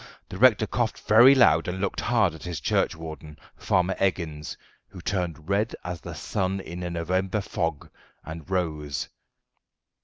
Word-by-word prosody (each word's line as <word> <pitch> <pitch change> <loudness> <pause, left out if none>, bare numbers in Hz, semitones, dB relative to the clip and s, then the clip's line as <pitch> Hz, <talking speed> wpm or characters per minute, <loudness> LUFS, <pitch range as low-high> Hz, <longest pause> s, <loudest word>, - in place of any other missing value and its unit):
the 90 - -7
rector 115 -3 +5
coughed 115 +1 -1
very 120 +6 +7
loud 85 -10 +5
and 90 +1 -3
looked 100 -1 -2
hard 110 -8 +2
at 80 - -11
his 85 -5 -5
churchwarden, 80 -2 -2 0.2
Farmer 90 +1 +1
Eggins, 80 -6 -2 0.3
who 95 - -12
turned 85 -4 -3
red 100 +3 0
as 90 -2 -5
the - - -8
sun 95 +1 -2
in 90 -1 -7
a 90 - -3
November 90 +4 -1
fog, 80 -5 -3 0.4
and 80 +1 -8
rose. 75 -6 -2
90 Hz, 150 wpm, -26 LUFS, 80-100 Hz, 0.4 s, very